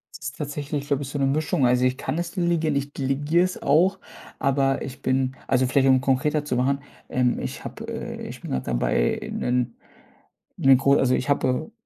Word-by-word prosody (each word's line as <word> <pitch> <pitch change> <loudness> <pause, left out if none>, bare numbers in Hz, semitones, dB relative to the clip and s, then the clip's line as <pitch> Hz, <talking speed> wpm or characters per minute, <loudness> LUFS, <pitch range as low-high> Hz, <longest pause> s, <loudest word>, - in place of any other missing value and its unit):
Es - - -9
ist 135 -2 -6
tatsächlich 145 -1 -4
so 140 - +2
ein - - -3
bisschen 145 0 -4
'ne 135 - +3
Mischung. 150 +1 +1
Also, 125 +1 +3
ich 130 0 +1
kann 130 +5 -3
es 170 0 -3
delegieren. 170 -5 0
Ich 140 +1 -2
delegiere 145 +5 +1
es 185 - -3
auch, 180 +7 +3 0.4
aber 135 0 +1
ich 135 -1 -7
bin 130 0 0
also 130 0 +3
vielleicht, 135 +1 +3
um 130 -1 +5
konkreter 145 +3 +1
zu 130 - -1
machen, 135 +3 +1 0.3
ähm, 125 -1 +1
ich - - -5
habe, - - -7
äh - - -6
ich - - -9
bin - - -7
grad 65 - -2
dabei, - - +1
'nen 125 -1 -1 0.8
'ne 135 0 +6
gro 140 +1 +3
also 130 -2 +3
ich 135 - -3
hatte 140 - 0
135 Hz, 200 wpm, -24 LUFS, 130-150 Hz, 0.8 s, ne